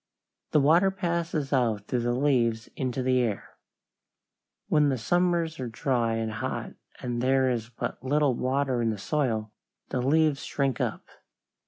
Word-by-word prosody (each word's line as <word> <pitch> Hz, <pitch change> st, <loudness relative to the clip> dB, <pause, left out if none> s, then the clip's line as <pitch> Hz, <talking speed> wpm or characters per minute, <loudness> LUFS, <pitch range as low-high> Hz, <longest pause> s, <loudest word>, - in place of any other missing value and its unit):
The 150 Hz, -, +3 dB
water 165 Hz, +7 st, +5 dB
passes 170 Hz, -6 st, -2 dB
out 115 Hz, -6 st, +1 dB
through 125 Hz, -, -1 dB
the 120 Hz, 0 st, 0 dB
leaves 120 Hz, -5 st, +1 dB
into 130 Hz, 0 st, -2 dB
the 130 Hz, 0 st, +3 dB
air. 115 Hz, -5 st, -3 dB, 1.1 s
When 150 Hz, -1 st, +3 dB
the 135 Hz, -, 0 dB
summers 170 Hz, +4 st, +1 dB
are 130 Hz, -, -3 dB
dry 115 Hz, -1 st, 0 dB
and 110 Hz, -1 st, -2 dB
hot 105 Hz, -, -4 dB, 0.3 s
and 120 Hz, -1 st, -2 dB
there 130 Hz, 0 st, +3 dB
is 115 Hz, -2 st, -3 dB
but 125 Hz, -, -5 dB
little 145 Hz, 0 st, +2 dB
water 130 Hz, 0 st, 0 dB
in 115 Hz, -, +1 dB
the 110 Hz, -, -2 dB
soil, 110 Hz, -3 st, -1 dB, 0.4 s
the 125 Hz, -, -1 dB
leaves 150 Hz, +2 st, +2 dB
shrink 135 Hz, -4 st, -1 dB
up. -, -, -3 dB
130 Hz, 155 wpm, -27 LUFS, 120-150 Hz, 1.1 s, water